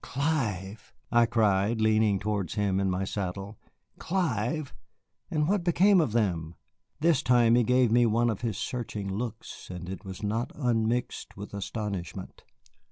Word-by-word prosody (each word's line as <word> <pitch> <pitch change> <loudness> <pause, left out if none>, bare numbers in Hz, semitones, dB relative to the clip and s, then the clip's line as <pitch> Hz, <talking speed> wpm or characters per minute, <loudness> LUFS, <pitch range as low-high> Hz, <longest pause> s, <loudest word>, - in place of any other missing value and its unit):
"Clive!" 115 - -2 0.2
I 120 -1 +5
cried, 110 -1 +2
leaning 110 -2 +3
towards 100 -4 -2
him 100 -2 +1
in 100 -1 +1
my 90 +1 -1
saddle. 100 +1 -4 0.4
"Clive! 155 - -1 0.6
And 150 -1 0
what 200 -1 +1
became 185 +2 +4
of 150 - 0
them?" 85 -8 -1 0.5
This 160 -3 +3
time 120 -4 +4
he 120 - +5
gave 125 0 +3
me 120 0 +5
one 115 +2 +2
of 105 - -5
his 115 -3 -2
searching 105 -5 -4
looks, 115 +1 -6
and 90 -1 -7
it 95 0 -6
was 95 +1 -8
not 110 +4 -1
unmixed 120 -5 -1
with 100 +1 -8
astonishment. 100 -3 -5
110 Hz, 150 wpm, -28 LUFS, 100-125 Hz, 0.6 s, I